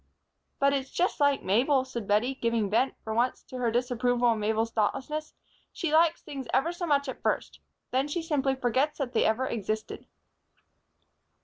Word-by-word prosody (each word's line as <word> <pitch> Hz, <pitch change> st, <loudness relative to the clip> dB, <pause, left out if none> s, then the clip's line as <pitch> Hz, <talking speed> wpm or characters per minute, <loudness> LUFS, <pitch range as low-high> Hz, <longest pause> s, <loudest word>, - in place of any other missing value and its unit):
"But 280 Hz, 0 st, +3 dB
it's 270 Hz, -1 st, -2 dB
just 360 Hz, -1 st, 0 dB
like 285 Hz, -1 st, +3 dB
Mabel," 255 Hz, +7 st, +2 dB
said 235 Hz, -5 st, -6 dB
Bettie, 215 Hz, +6 st, +2 dB
giving 230 Hz, -5 st, -1 dB
vent, 245 Hz, +5 st, +2 dB
for 220 Hz, -, -4 dB
once, 240 Hz, +3 st, 0 dB
to 255 Hz, -, -9 dB
her 240 Hz, -2 st, +1 dB
disapproval 245 Hz, 0 st, +1 dB
of 225 Hz, -, -1 dB
Mabel's 220 Hz, +2 st, 0 dB
thoughtlessness. 285 Hz, +8 st, -2 dB, 0.4 s
"She 325 Hz, -4 st, -3 dB
likes 325 Hz, +1 st, +4 dB
things 275 Hz, -4 st, -7 dB
ever 325 Hz, +6 st, +2 dB
so 350 Hz, 0 st, -4 dB
much 280 Hz, -2 st, +2 dB
at 260 Hz, -, -6 dB
first. -, -, -1 dB, 0.3 s
Then 265 Hz, +3 st, +1 dB
she 330 Hz, +3 st, -3 dB
simply 280 Hz, -4 st, 0 dB
forgets 260 Hz, +4 st, 0 dB
that 265 Hz, -4 st, -3 dB
they -, -, +3 dB
ever 225 Hz, +4 st, +1 dB
existed." 215 Hz, -2 st, -4 dB
260 Hz, 175 wpm, -28 LUFS, 230-285 Hz, 0.4 s, likes